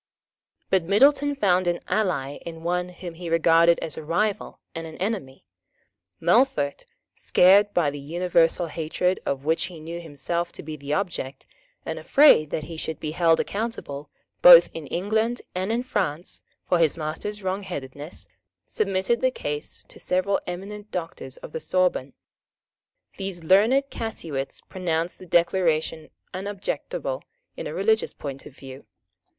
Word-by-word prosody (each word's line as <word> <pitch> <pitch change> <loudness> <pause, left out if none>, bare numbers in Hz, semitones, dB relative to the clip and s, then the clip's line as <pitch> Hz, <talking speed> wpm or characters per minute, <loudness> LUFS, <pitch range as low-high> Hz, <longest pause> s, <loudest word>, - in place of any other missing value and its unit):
But 190 - +4
Middleton 280 - +4
found 185 -7 +2
an 175 0 +1
ally 150 -10 0
in 165 -1 -9
one 180 +1 -1
whom 175 -1 -8
he 170 +1 -7
regarded 165 +1 +5
as 160 - -2
a 160 - -5
rival 195 +7 -1
and 165 -1 -5
an 160 - -10
enemy. 185 - -4 0.7
Melfort, 175 - +2 0.3
scared 200 +3 +5
by 155 -5 +3
the 145 - -7
universal 170 +3 +2
hatred 165 +3 -1
of 140 0 -2
which 160 +1 +1
he 175 -3 -9
knew 165 +2 -6
himself 170 +2 -3
to - - -8
be 155 0 -6
the 140 -1 -7
object, 150 -5 -3 0.4
and - - -4
afraid 275 - +6
that 155 - -3
he 165 +1 -8
should 160 -1 -4
be 155 - -4
held 165 0 +3
accountable, 200 -10 -4 0.3
both 175 -1 +10
in 160 -3 -7
England 220 - -1
and 185 +3 -2
in 235 +2 0
France, 185 - -3 0.3
for 175 - +3
his 160 -2 +3
master's 165 +7 -4
wrongheadedness, 175 -6 -5 0.4
submitted 190 - 0
the 260 - +4
case 150 -11 -5
to - - -11
several 185 +2 +1
eminent 200 +4 -6
Doctors 165 -6 -6
of - - -11
the 160 - -4
Sorbonne. 160 -4 0 1.0
These 190 -3 -5
learned 215 - +5
casuists 160 -12 -5
pronounced 170 -2 -2
the 185 - -12
Declaration 165 -3 +1 0.2
unobjectionable 205 - -4 0.3
in - - -5
a - - -5
religious 445 +1 +1
point 140 -2 -7
of 135 - -15
view. 135 0 -11
175 Hz, 145 wpm, -25 LUFS, 155-195 Hz, 1.0 s, both